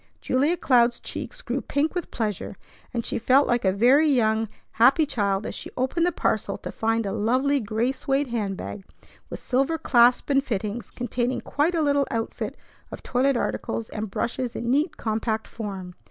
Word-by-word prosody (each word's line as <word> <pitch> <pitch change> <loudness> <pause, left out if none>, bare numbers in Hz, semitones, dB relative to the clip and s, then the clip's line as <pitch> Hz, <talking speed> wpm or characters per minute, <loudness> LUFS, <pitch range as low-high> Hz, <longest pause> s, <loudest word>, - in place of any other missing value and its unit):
Julia 290 +7 +1
Cloud's 240 -5 +3
cheeks - - -7
grew - - -2
pink 290 +3 0
with 355 -2 -3
pleasure, 215 -4 -3 0.4
and 235 -2 -3
she - - -1
felt 260 +5 +4
like 240 0 +1
a 190 - +3
very 255 +10 +4
young, 220 -4 +2 0.2
happy 265 +7 +5
child 200 -6 -1
as - - -4
she - - -7
opened 295 +7 +1
the - - +2
parcel - - -1
to - - -7
find 225 0 0
a 195 - -2
lovely 255 +7 +1
gray 225 +2 0
suède 275 0 -1
hand 205 -5 -2
bag 200 - -7 0.5
with - - -6
silver 275 +6 0
clasp 245 -3 +4
and 275 0 +3
fittings, 215 -1 -3
containing 245 +1 -2
quite 315 +5 0
a 320 - +2
little 285 -1 +2
outfit 225 -1 -3 0.3
of - - -9
toilet 260 +1 +1
articles 230 -1 -3
and 215 -1 -4
brushes 245 +4 -3
in 235 +1 -2
neat, 300 +5 +1
compact 220 0 -2
form. 195 -5 -6
240 Hz, 180 wpm, -25 LUFS, 220-275 Hz, 0.5 s, happy